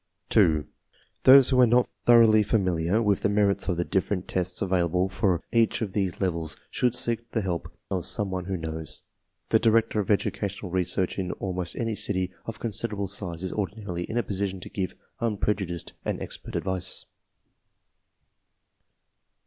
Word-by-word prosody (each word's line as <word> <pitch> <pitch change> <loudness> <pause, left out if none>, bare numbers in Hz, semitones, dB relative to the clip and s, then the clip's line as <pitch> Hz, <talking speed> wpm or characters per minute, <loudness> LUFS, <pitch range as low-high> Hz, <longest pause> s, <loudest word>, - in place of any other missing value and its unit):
2. 75 -2 +4 0.6
Those 135 0 +9
who 130 -1 +5
are 125 - +7
not 120 +2 +4 0.2
thoroughly 115 -2 +7
familiar 95 -1 +1
with 100 -2 +2
the - - +2
merits 100 -1 +2
of 90 - 0
the 85 - 0
different 95 -1 -1
tests 90 -1 -1
available 90 -1 +1
for 95 -2 0
each 115 0 +2
of 100 -4 -5
these 95 -4 -1
levels 85 -4 -2
should 125 -1 +1
seek 115 0 -1
the 110 - -1
help 90 -4 -3 0.2
of 95 -3 -1
some 100 +2 +1
one 90 -1 -3
who 95 0 -2
knows. 80 -1 -6 0.5
The - - +4
director 115 -1 +3
of 100 - -2
educational 100 -2 -1
research 90 +1 0
in 90 -1 -2
almost 90 -3 -3
any 115 -2 -1
city 95 -3 0
of 115 - -5
considerable 105 -3 -2
size 90 -3 -4
is 95 - -3
ordinarily 100 -4 -3
in 115 - -4
a 120 - +2
position 95 -2 -2
to - - -8
give 95 -2 -3 0.2
unprejudiced 100 -6 -2
and - - -2
expert - - -5
advice. 95 -1 -2
95 Hz, 160 wpm, -26 LUFS, 90-110 Hz, 0.6 s, Those